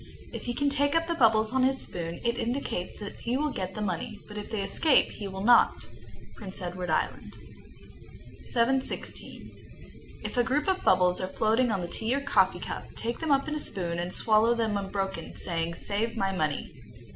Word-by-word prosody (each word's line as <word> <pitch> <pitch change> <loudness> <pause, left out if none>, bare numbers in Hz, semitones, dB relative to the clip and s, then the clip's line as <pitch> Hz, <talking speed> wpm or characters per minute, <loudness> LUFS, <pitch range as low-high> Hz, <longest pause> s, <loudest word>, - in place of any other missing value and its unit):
If - - -6
he 240 - -2
can 285 +1 +1
take 285 +1 +1
up 330 0 +3
the 335 - -1
bubbles 220 -7 +4
on 260 0 +2
his 265 +1 +3
spoon, 170 -1 -3
it 235 0 +1
indicates 235 -6 -3
that 205 -1 -8
he 240 +2 -1
will 300 +1 0
get 190 -5 -4
the 215 - -3
money, 200 +2 -3
but 210 - -10
if 210 0 -6
they 215 -3 -2
escape 295 +7 +3
he 205 - -6
will 190 0 -5
not. 240 +2 +6 0.6
Prince 195 -3 -6
Edward 180 -1 -4
Island. 155 - -1 1.1
716. 260 +2 -1 0.7
If - - -5
a 245 - +5
group 285 +5 0
of 380 -1 +1
bubbles 180 -1 +4
are 185 - -1
floating 225 +5 +2
on 200 -4 0
the 175 - -3
tea 225 +8 -1
or - - +1
coffee 280 - +3
cup, - - -5
take 235 +1 -3
them 320 -2 -1
up 275 +1 +3
in 305 - -2
a 305 - -2
spoon, 170 -10 -2
and 175 +1 -3
swallow 220 +3 +4
them 225 -3 0
unbroken, 195 -3 -3
saying, 170 -1 -2
"Save 220 +5 -2
my 195 0 +1
money." 155 -4 -2
220 Hz, 195 wpm, -28 LUFS, 185-260 Hz, 1.1 s, not